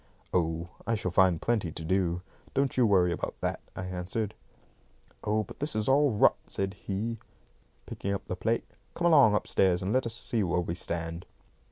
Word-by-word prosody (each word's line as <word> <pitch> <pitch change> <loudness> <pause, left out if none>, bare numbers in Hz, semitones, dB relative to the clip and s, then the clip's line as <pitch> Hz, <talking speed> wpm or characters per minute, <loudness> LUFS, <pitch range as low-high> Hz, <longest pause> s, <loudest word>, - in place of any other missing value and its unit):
"Oh, 85 -1 0 0.2
I 115 - +2
shall 95 -4 -2
find 90 -2 +4
plenty 105 -7 0
to 80 - -6
do. 90 0 +1 0.3
Don't 135 0 +1
you 125 -3 +4
worry 90 -4 +4
about 85 - -3
that," - - -1 0.2
I 90 - -4
answered. 95 +4 -3 0.9
"Oh, 110 +1 +1
but - - -12
this 145 -4 -2
is 110 -1 0
all 145 +2 +5
rot," 105 -4 +4
said 95 0 -2
he, 105 +4 -4 0.7
picking 100 - -4
up 100 - -3
the 90 - -3
plate. 115 +5 0 0.3
"Come 175 - -1
along 140 -11 +7
upstairs 95 -3 +2
and 95 - 0
let 130 -1 +2
us 115 - -3
see 115 -1 -1
where 90 -2 +1
we 85 -1 -3
stand." 85 0 -4
95 Hz, 185 wpm, -29 LUFS, 90-115 Hz, 0.9 s, along